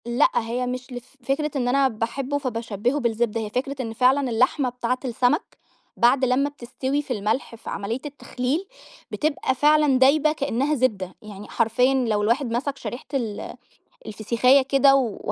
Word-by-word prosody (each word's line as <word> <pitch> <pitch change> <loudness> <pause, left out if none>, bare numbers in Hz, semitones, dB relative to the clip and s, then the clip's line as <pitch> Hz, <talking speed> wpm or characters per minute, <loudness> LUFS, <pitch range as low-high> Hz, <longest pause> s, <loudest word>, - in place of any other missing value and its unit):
لأ 240 0 +3
هي 240 +2 -1
مش 250 +1 -5
ل 245 - -5
فكرة 275 +4 -3
إن 250 -3 0
أنا 270 +2 +3
باحبه 255 +4 -3
فبشبهُه 235 -1 -2
بالزبدة، 230 -2 -1
هي 215 - -4
فكرة 260 +5 -3
إن 225 -3 -5
فعلًا 260 +3 +2
اللحمة 255 +3 +1
بتاعة 250 +1 -2
السمك 250 - 0 0.4
بعد 255 +3 +4
لمّا 260 +3 +1
بتستوي 265 +1 -3
في 275 - -4
الملح، 220 +3 -2
في 225 - -10
عملية 215 +5 -3
التخليل 285 +3 -3 0.5
بتبقى 300 -3 -1
فعلًا 295 -1 +4
دايبة 295 +3 +4
كأنها 280 0 -1
زبدة، 205 -8 -1
يعني 210 -1 -10
حرفيًا 240 +3 +2
لو 230 -6 +1
الواحد 235 +3 +1
مسك 270 +4 -2
شريحة 245 - -7
ال 230 -6 -3 0.5
الفسيخاية 235 +6 +3
كده، 275 +1 +4
و 245 -6 0
255 Hz, 155 wpm, -23 LUFS, 230-275 Hz, 0.5 s, بعد